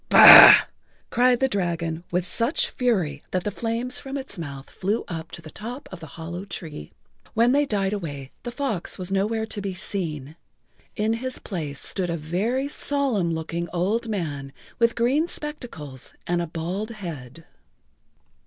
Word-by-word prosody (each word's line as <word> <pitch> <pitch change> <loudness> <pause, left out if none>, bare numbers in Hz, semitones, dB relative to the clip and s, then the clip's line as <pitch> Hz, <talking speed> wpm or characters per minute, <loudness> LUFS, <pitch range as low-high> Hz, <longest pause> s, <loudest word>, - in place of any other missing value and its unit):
"Bah!" - - +11 0.5
cried 245 0 +3
the 265 - +3
dragon 170 -6 -2
with 180 0 0
such 230 - 0
fury 185 - 0
that 185 -1 -1
the 210 - -2
flames 235 +3 -3
from 270 +1 -6
its 265 -6 -7
mouth 140 -6 -7
flew 205 +5 -2
up 165 -2 -6
to 170 - -10
the 155 - -10
top 240 - -8
of 185 - -8
the 160 - -9
hollow 175 +3 -6
tree. 160 - -7 0.4
When 235 +2 +4
they 285 +2 +3
died 200 -3 0
away 145 -9 -5
the 240 - -5
fox 240 -8 -3
was 185 -1 -5
nowhere 215 +3 0
to 215 -2 -6
be 195 -2 -4
seen. 160 -6 -4 0.6
In 215 +1 +1
his 255 +3 -3
place 155 -8 -5
stood 185 -3 -3
a 170 - -1
very 205 - -1
solemn 275 - 0
looking 170 +1 -4
old 210 +7 -1
man 145 -9 -4 0.3
with 230 0 +3
green 265 +8 +2
spectacles 235 - -7
and 175 0 0
a 170 - -3
bald 175 +7 -4
head. 165 - -8
190 Hz, 160 wpm, -24 LUFS, 165-230 Hz, 0.6 s, Bah